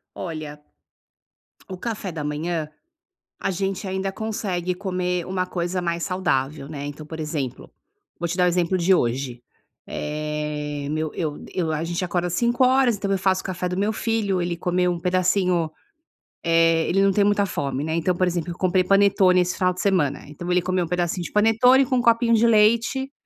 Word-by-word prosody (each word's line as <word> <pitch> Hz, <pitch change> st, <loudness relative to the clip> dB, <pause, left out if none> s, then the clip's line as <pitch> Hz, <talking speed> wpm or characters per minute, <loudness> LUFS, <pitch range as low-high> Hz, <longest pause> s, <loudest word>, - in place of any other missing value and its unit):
Olha, 155 Hz, -3 st, -6 dB, 1.1 s
o 185 Hz, -, -6 dB
café 205 Hz, -2 st, -4 dB
da 155 Hz, -2 st, -5 dB
manhã 155 Hz, +2 st, -2 dB, 0.7 s
a -, -, -1 dB
gente 195 Hz, +1 st, -2 dB
ainda 190 Hz, +1 st, -2 dB
consegue 190 Hz, -4 st, -3 dB
comer 180 Hz, -2 st, -2 dB
uma 185 Hz, 0 st, -2 dB
coisa 180 Hz, 0 st, -2 dB
mais 170 Hz, -1 st, -2 dB
saudável, 150 Hz, -6 st, -1 dB
né. 145 Hz, -2 st, -6 dB
Então 145 Hz, +1 st, -7 dB
por 160 Hz, +1 st, -8 dB
exemplo, 150 Hz, -5 st, -4 dB, 0.5 s
vou 170 Hz, -, -1 dB
te 180 Hz, -, -3 dB
dar 180 Hz, -, +3 dB
o -, -, +4 dB
exemplo 180 Hz, +1 st, +1 dB
de 180 Hz, +2 st, +3 dB
hoje, 125 Hz, -4 st, -1 dB, 0.5 s
eh, 150 Hz, -1 st, -4 dB
meu 155 Hz, 0 st, -2 dB
eu 155 Hz, -4 st, -3 dB
eu 170 Hz, -4 st, -1 dB
a 155 Hz, +1 st, -1 dB
gente 170 Hz, +2 st, -2 dB
acorda 175 Hz, 0 st, -1 dB
5:00 240 Hz, +8 st, +1 dB
horas, 255 Hz, -3 st, +4 dB
então 200 Hz, 0 st, -2 dB
eu 195 Hz, -, +2 dB
faço 190 Hz, 0 st, +1 dB
o -, -, -23 dB
café 180 Hz, -1 st, -3 dB
do 180 Hz, 0 st, -3 dB
meu 205 Hz, +2 st, +1 dB
filho, 215 Hz, -3 st, -1 dB
ele 175 Hz, 0 st, -1 dB
comeu 180 Hz, +1 st, 0 dB
um 170 Hz, -, -3 dB
pedacinho 180 Hz, -2 st, +1 dB, 0.7 s
eh, 165 Hz, -1 st, +3 dB
ele 195 Hz, -, +2 dB
não 195 Hz, -, +4 dB
tem 200 Hz, +1 st, +3 dB
muita 205 Hz, 0 st, +3 dB
fome, 140 Hz, -6 st, -3 dB
né. 160 Hz, +1 st, -2 dB
Então 170 Hz, +2 st, +1 dB
por 185 Hz, -, +2 dB
exemplo 175 Hz, -1 st, -2 dB
eu 170 Hz, -, -8 dB
comprei 185 Hz, 0 st, +2 dB
panetone 195 Hz, -2 st, +4 dB
esse 180 Hz, 0 st, -1 dB
final 185 Hz, -1 st, +2 dB
de 180 Hz, -, -6 dB
semana, 180 Hz, -9 st, +1 dB
então 175 Hz, +4 st, -7 dB
ele 180 Hz, 0 st, +3 dB
comeu 185 Hz, 0 st, 0 dB
um -, -, -8 dB
pedacinho 175 Hz, +1 st, -1 dB
de -, -, -7 dB
panetone 225 Hz, +5 st, +5 dB
com 255 Hz, 0 st, 0 dB
um -, -, +2 dB
copinho 235 Hz, 0 st, +3 dB
de 230 Hz, +1 st, +4 dB
leite, 230 Hz, +5 st, +3 dB
180 Hz, 195 wpm, -23 LUFS, 160-195 Hz, 1.1 s, panetone